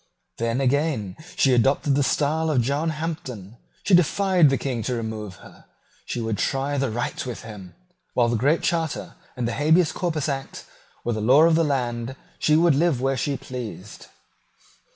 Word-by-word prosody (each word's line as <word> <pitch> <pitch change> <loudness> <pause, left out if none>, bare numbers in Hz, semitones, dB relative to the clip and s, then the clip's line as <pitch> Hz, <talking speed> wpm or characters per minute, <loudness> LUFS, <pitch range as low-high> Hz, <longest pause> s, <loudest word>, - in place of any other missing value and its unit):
Then 115 +2 0
again 135 - 0 0.2
she 135 - +3
adopted 135 +3 +2
the 140 - +2
style 155 +3 +1
of 130 -6 +2
John 145 +6 0
Hampden. 135 - -5 0.3
She 200 - 0
defied 180 -1 +4
the 135 - +1
King 125 -4 -3
to 125 +3 -2
remove 110 -4 -5
her. - - -16 0.4
She - - -3
would 110 -3 -2
try 140 +1 -1
the 135 -1 0
right 120 +2 -3
with 125 -3 -6
him. 105 -5 -10 0.4
While 120 -1 +3
the 120 - 0
Great 140 +9 +2
Charter 165 -3 -1 0.2
and 120 -2 -1
the 115 - -2
Habeas 155 +4 +3
Corpus 160 -5 -2
Act 135 -2 -5 0.4
were 120 - 0
the 110 - -3
law 130 +8 +6
of 165 0 +5
the 165 +1 +3
land, 125 -3 -2 0.2
she 150 - +3
would 165 0 +4
live 150 -2 +2
where 135 +1 0
she 140 +2 -1
pleased. 105 -7 -8
135 Hz, 175 wpm, -24 LUFS, 115-155 Hz, 0.4 s, law